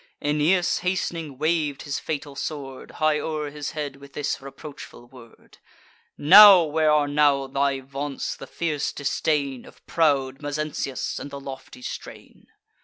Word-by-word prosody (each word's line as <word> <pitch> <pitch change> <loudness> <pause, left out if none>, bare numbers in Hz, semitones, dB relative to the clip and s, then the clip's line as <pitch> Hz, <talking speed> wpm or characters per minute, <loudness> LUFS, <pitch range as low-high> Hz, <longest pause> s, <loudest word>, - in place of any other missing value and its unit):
Aeneas, 155 +5 +1
hast'ning, 170 -5 -3
wav'd 155 -2 0
his 145 - -3
fatal 145 -2 -5
sword 135 -2 -6
High 155 -1 +1
o'er 155 -2 -3
his 150 0 -6
head, 145 -3 -5
with 140 0 -15
this 145 -2 -3
reproachful 140 -2 -11
word: 120 -3 -17 0.6
"Now; 195 +3 +9
where 155 0 +1
are 150 -1 +3
now 145 -1 +3
thy 135 0 -1
vaunts, 140 +1 -5
the - - -10
fierce 155 -4 -2
disdain 140 -2 -1
Of - - -18
proud 140 -4 +1
Mezentius, 145 -2 -3
and 145 - -7
the 140 0 -7
lofty 135 -2 -10
strain?" - - -9
145 Hz, 140 wpm, -24 LUFS, 140-155 Hz, 0.6 s, Now